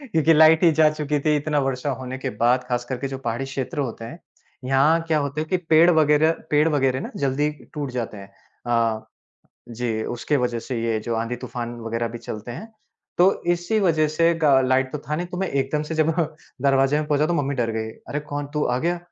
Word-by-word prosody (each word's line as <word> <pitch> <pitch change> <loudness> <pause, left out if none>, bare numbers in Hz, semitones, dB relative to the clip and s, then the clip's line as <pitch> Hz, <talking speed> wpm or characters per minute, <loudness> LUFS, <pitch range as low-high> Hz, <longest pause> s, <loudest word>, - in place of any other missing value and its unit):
क्योंकि 160 0 +4
लाइट 160 +1 +6
ही 170 - +7
जा 155 0 +5
चुकी 150 -1 -2
थी, 150 +1 +2
इतना 150 0 0
वर्षा 135 +1 -2
होने 130 0 -6
के - - -3
बाद। 125 +2 +3
खासकर 120 +1 -2
के 140 - -3
जो 135 0 -5
पहाड़ी 120 0 -3
क्षेत्र 135 +1 -5
होते 120 -5 -3
हैं, 155 +9 -9 0.5
यहाँ 140 +5 +3
क्या 155 -1 +2
होते 140 +1 -2
हैं 155 - -4
कि 185 - +3
पेड़ 165 -1 +4
वगैरह 155 -1 +4 0.2
पेड़ 150 +2 +4
वगैरह 135 -4 +1
ना - - -6
जल्दी 140 +2 0 0.2
टूट 145 -3 -3
जाते 120 -3 -4
हैं। 100 0 -12 0.3
अ, 115 -2 0 0.6
जी, 115 -2 -3
उसके 120 +5 -1
वजह 125 -3 -1
से 115 0 -4
ये 115 -1 0
जो 115 +2 -3
आंधी-तूफ़ान 120 +1 -4
वगैरह 115 +1 -2
भी 120 +1 -7
चलते 110 +1 -7
हैं, 220 - -9 0.5
तो 185 +2 +4
इसी 175 +6 -1
वजह 160 -5 +2
से 165 +2 +2
गा 140 -4 +4
लाइट 130 0 +1
तो 150 - -3
था 150 +1 -4
नहीं, 175 +2 -3
तो 180 - -7
मैं 190 - -1
एकदम 140 +2 -1
से 155 +1 -5
जब 155 0 +2 0.5
दरवाज़े 135 +1 +3
में 155 - -2
पहुँचा, 150 0 +2
तो 175 - 0
मम्मी 140 -3 0
डर 120 -3 -1
गईं। 110 0 -3 0.2
"अरे! 150 - -2
कौन? 145 -1 -5
तू 150 - +1
आ 125 - 0
गया?" 175 +5 -1
140 Hz, 220 wpm, -23 LUFS, 125-155 Hz, 0.6 s, ही